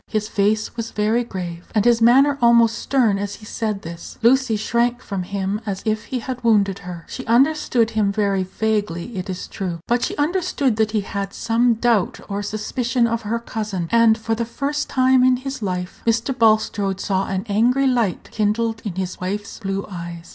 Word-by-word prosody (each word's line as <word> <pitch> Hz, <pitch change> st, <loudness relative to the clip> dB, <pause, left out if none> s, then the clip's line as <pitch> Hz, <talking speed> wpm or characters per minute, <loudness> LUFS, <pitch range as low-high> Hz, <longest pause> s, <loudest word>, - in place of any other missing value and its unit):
His 215 Hz, -1 st, -2 dB
face 215 Hz, +1 st, 0 dB
was 230 Hz, -1 st, -4 dB
very 215 Hz, +3 st, +1 dB
grave, 175 Hz, -6 st, -6 dB
and 210 Hz, -, +3 dB
his 235 Hz, -1 st, +4 dB
manner 275 Hz, +5 st, +5 dB
almost 235 Hz, -2 st, +5 dB
stern 230 Hz, -8 st, +2 dB
as 205 Hz, 0 st, -4 dB
he 215 Hz, -, -14 dB
said 215 Hz, -2 st, -3 dB
this. 170 Hz, +1 st, -9 dB
Lucy 250 Hz, -1 st, +4 dB
shrank 235 Hz, +3 st, 0 dB
from 200 Hz, -6 st, -4 dB
him 200 Hz, +2 st, -3 dB
as 200 Hz, -3 st, -4 dB
if 215 Hz, 0 st, -1 dB
he 260 Hz, -, -3 dB
had 250 Hz, +1 st, -5 dB
wounded 200 Hz, -4 st, +3 dB
her. 180 Hz, -3 st, -8 dB
She 260 Hz, -, -6 dB
understood 245 Hz, -2 st, +3 dB
him 210 Hz, -2 st, +1 dB
very 200 Hz, -2 st, +1 dB
vaguely, 205 Hz, 0 st, -2 dB
it 185 Hz, 0 st, -5 dB
is 185 Hz, -1 st, -5 dB
true, 180 Hz, -4 st, -4 dB
but 240 Hz, +1 st, +2 dB
she -, -, -2 dB
understood 295 Hz, -, 0 dB
that 220 Hz, -1 st, +2 dB
he 215 Hz, -1 st, 0 dB
had 195 Hz, 0 st, -4 dB
some 235 Hz, +1 st, +2 dB
doubt 225 Hz, -4 st, +1 dB
or 200 Hz, 0 st, -3 dB
suspicion 235 Hz, +4 st, -1 dB
of 230 Hz, 0 st, -1 dB
her 220 Hz, +2 st, -2 dB
cousin, 215 Hz, -6 st, -4 dB
and, 230 Hz, -1 st, +5 dB
for 225 Hz, 0 st, -2 dB
the 230 Hz, +1 st, -1 dB
first 285 Hz, +5 st, -3 dB
time 260 Hz, -1 st, +4 dB
in 255 Hz, 0 st, +4 dB
his 270 Hz, 0 st, -6 dB
life, 180 Hz, -3 st, -4 dB
Mr. 230 Hz, +3 st, +1 dB
Bulstrode 215 Hz, -4 st, +2 dB
saw 195 Hz, -1 st, -1 dB
an 190 Hz, +1 st, -2 dB
angry 240 Hz, +6 st, +2 dB
light 240 Hz, -8 st, 0 dB
kindled 225 Hz, +1 st, 0 dB
in 200 Hz, -5 st, -4 dB
his 185 Hz, -1 st, -4 dB
wife's 200 Hz, +3 st, -4 dB
blue 195 Hz, -2 st, -3 dB
eyes. 170 Hz, -2 st, -8 dB
220 Hz, 190 wpm, -21 LUFS, 200-235 Hz, -, manner